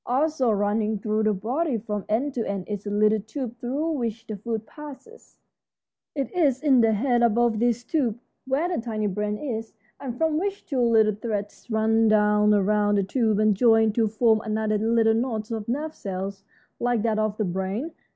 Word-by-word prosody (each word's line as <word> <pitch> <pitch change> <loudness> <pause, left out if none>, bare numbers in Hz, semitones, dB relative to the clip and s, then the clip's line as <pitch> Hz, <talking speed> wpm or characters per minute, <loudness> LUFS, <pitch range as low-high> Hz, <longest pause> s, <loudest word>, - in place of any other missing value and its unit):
Also 270 0 +1
running 210 +1 0
through 215 +2 -1
the 215 0 +2
body, 250 - -1
from 210 -2 -4
end 255 +7 0
to 235 - -1
end, 195 -2 -4
is 205 -1 -5
a - - -1
little 215 +1 +3
tube 235 +3 -6
through 280 +7 -2
which 230 -6 -3
the 215 - -5
food 220 +1 -4
passes. 300 - -13 0.8
It 275 -2 -2
is 285 -6 +2
in 270 -5 +5
the 225 -1 +3
head 240 +3 +1
above 235 -1 +2
this 240 0 +1
tube 245 -7 -1 0.3
where 275 +6 +1
the 355 -8 -2
tiny 215 -3 -2
brain 210 +1 -2
is, 225 -6 -5 0.2
and 250 -3 -6
from 320 0 +1
which 400 +2 -3
two 270 -6 -1
little 220 -2 +4
threads 205 -1 -5
run 220 0 +2
down 210 0 +4
around 205 0 +2
the 200 - +2
tube 220 +1 +1
and 215 -1 +3
join 225 0 +4
to 225 0 +2
form 220 0 +2
another 215 -1 -1
little 225 0 +3
knot 225 -2 -2
of 220 -2 -4
nerve 300 +6 -2
cells 195 -2 -5 0.4
like 240 -3 0
that 220 -2 +1
of 215 -1 -1
the 215 - 0
brain. 190 - -3
225 Hz, 190 wpm, -25 LUFS, 210-245 Hz, 0.8 s, in